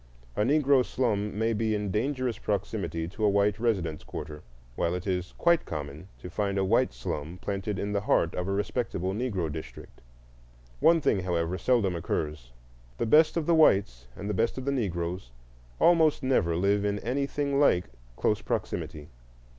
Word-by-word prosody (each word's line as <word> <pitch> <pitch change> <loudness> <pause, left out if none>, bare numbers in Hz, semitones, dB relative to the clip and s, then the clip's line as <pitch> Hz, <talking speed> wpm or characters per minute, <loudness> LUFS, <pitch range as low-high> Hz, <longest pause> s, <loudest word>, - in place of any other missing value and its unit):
A - - 0
Negro 140 +2 +4
slum 105 -6 -1
may 115 +1 +1
be 110 0 0
in 105 -2 -2
dangerous 130 +2 -1
proximity 100 -5 -2
to 110 +4 -6
a 105 - +5
white 100 +1 +2
residence 95 -10 -1
quarter, 75 -1 -7 0.3
while 85 +6 0
it 90 - -5
is 90 -2 -2
quite 170 -1 +3
common 75 +2 -6
to - - -9
find 100 +2 -2
a 95 - +2
white 115 +6 +2
slum 75 +7 -5
planted 100 0 -3
in 100 +2 -3
the 100 -1 0
heart 85 -5 +2
of 90 0 -3
a - - -1
respectable 100 -2 -2
Negro 100 -8 -2
district. 80 +1 -9 0.8
One 165 - +5
thing, 100 - +2
however, 90 -1 -1
seldom 110 -8 +2
occurs: 75 -6 -3 0.5
the 115 - -1
best 155 +8 +5
of 165 - 0
the 170 - +3
whites 95 - +3
and 100 - -6
the 105 - -1
best 115 +6 0
of 130 - -5
the 140 - +1
Negroes 90 - -2 0.5
almost 160 -4 +4
never 85 -11 +2
live 100 +3 +2
in 105 0 0
anything 140 +2 -1
like 90 -11 +4 0.3
close - - 0
proximity. 75 -1 -4
100 Hz, 170 wpm, -28 LUFS, 90-125 Hz, 0.8 s, a